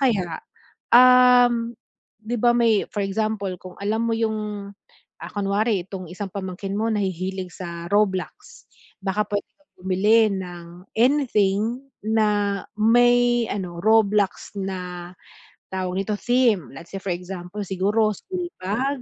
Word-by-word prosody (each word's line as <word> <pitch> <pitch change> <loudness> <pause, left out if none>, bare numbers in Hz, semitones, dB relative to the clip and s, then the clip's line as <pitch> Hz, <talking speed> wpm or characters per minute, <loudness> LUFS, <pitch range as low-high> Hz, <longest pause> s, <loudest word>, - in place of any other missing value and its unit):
kaya, 195 -11 0 0.5
um, 245 -1 +6 0.6
'di 240 - -1
ba 240 +1 +3
may 230 -3 +3
for 205 - -4
example, 200 -1 -1
kung 180 +1 -13
alam 215 +3 -1
mo 230 - 0
yung, 215 -3 -2 0.6
ah - - -7
kunwari 200 -1 0
itong 185 -3 -7
isang 195 +2 -5
pamangkin 195 0 -5
mo 220 +2 0
nahihilig 190 -2 -3
sa 170 -2 -7
Roblox, 205 - -1 0.3
baka 200 +2 0
pwede 205 0 -1
ka 295 - -36
bumili 205 +4 +3
ng 175 -2 -6 0.3
anything 230 -3 +2 0.2
na 205 -3 +1 0.2
may 240 +1 +4
ano, 180 -4 -4
Roblox 210 -3 +2
na, 180 -2 -5 0.6
tawag 185 -1 -3
nito, 210 +2 -2
theme. 235 - +2
Let's 165 +7 -12
say 195 - -5
for 190 -2 -2
example, 180 +2 -7
siguro 205 +4 +1
school 360 - -5
bag 255 +8 -1
205 Hz, 130 wpm, -23 LUFS, 190-230 Hz, 0.6 s, um